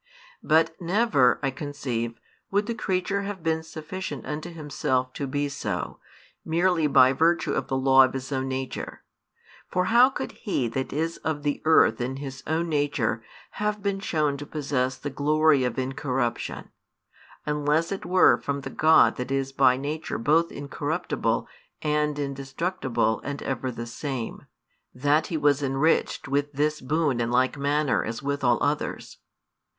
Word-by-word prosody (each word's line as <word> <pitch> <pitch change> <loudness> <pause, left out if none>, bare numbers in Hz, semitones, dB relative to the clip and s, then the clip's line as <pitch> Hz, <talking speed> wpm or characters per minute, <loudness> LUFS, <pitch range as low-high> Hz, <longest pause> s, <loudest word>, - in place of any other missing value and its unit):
But 160 +1 +2
never, 175 - +3
I 135 - +1
conceive, 130 -5 -4 0.3
would 205 +1 +1
the 235 - -2
creature 200 -2 -1
have 200 -3 -6
been 160 -1 +1
sufficient 160 +4 -6
unto 155 +3 -5
himself 135 -5 -2
to 140 - -4
be 145 +2 -1
so, 140 - -4 0.4
merely 170 -1 +2
by 130 -2 +6
virtue 165 +5 +2
of - - -1
the 135 - -1
law 135 0 +6
of 130 - +1
his 135 +1 -5
own 135 -1 -1
nature; 130 0 -5 0.7
for 180 0 +1
how 245 +2 +7
could 265 - -5
he 135 - -2
that 130 +3 -3
is 165 +4 -2
of 155 -2 -3
the 145 -1 -1
earth 155 -8 +5
in 130 +2 -2
his 135 -1 -7
own 165 +2 0
nature 145 -7 0 0.4
have 210 -1 -1
been 200 -1 0
shown 150 -7 0
to 145 - -7
possess 135 -4 -1
the 145 - -5
glory 150 0 +3
of 125 -2 -2
incorruption, 130 -2 -2 0.7
unless 150 +3 +1
it 195 - -3
were 180 +1 +5
from 140 0 -2
the - - -7
God 160 +1 +5
that 125 0 -4
is 135 0 -1
by 130 -2 +4
nature 150 +4 -3
both 160 +7 +2
incorruptible 145 +4 -2 0.4
and 150 -1 +1
indestructible 135 -3 -1
and 145 0 -5
ever 130 -1 -2
the 115 -1 -5
same, 125 0 -5 0.5
that 145 +4 +2
he 165 - -2
was 145 -1 +3
enriched 135 +3 +1
with 145 +2 0
this 150 +2 0
boon 145 -2 0
in 115 - 0
like 125 +3 +2
manner 145 0 +1
as 115 +4 -5
with 140 0 -2
all 120 -2 +4
others? - - -2
145 Hz, 160 wpm, -26 LUFS, 130-160 Hz, 0.7 s, how